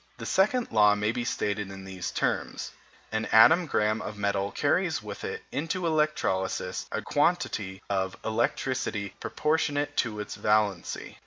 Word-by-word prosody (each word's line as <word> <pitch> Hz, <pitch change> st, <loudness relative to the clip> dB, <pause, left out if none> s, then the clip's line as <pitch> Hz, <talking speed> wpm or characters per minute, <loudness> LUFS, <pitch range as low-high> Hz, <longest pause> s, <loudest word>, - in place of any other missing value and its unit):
The -, -, -7 dB
second 230 Hz, +6 st, +2 dB
law 105 Hz, -2 st, +5 dB
may 105 Hz, +1 st, 0 dB
be 120 Hz, +1 st, -2 dB
stated 105 Hz, -3 st, -2 dB
in 95 Hz, 0 st, -9 dB
these 95 Hz, -2 st, -5 dB
terms: -, -, -2 dB, 0.4 s
an 110 Hz, 0 st, -1 dB
atom 160 Hz, +10 st, +6 dB
gramme 110 Hz, -4 st, +1 dB
of 105 Hz, -, -6 dB
metal 100 Hz, -1 st, 0 dB
carries 160 Hz, -, +1 dB
with 105 Hz, -1 st, -7 dB
it -, -, -4 dB
into 165 Hz, +5 st, -2 dB
electrolysis 150 Hz, -, 0 dB
a -, -, -2 dB
quantity 95 Hz, -1 st, 0 dB
of 95 Hz, -1 st, -1 dB
electricity 110 Hz, -2 st, -1 dB
proportionate 145 Hz, -2 st, 0 dB
to 110 Hz, -3 st, 0 dB
its 105 Hz, -, -5 dB
valency. 105 Hz, -4 st, 0 dB
110 Hz, 145 wpm, -28 LUFS, 100-145 Hz, 0.4 s, atom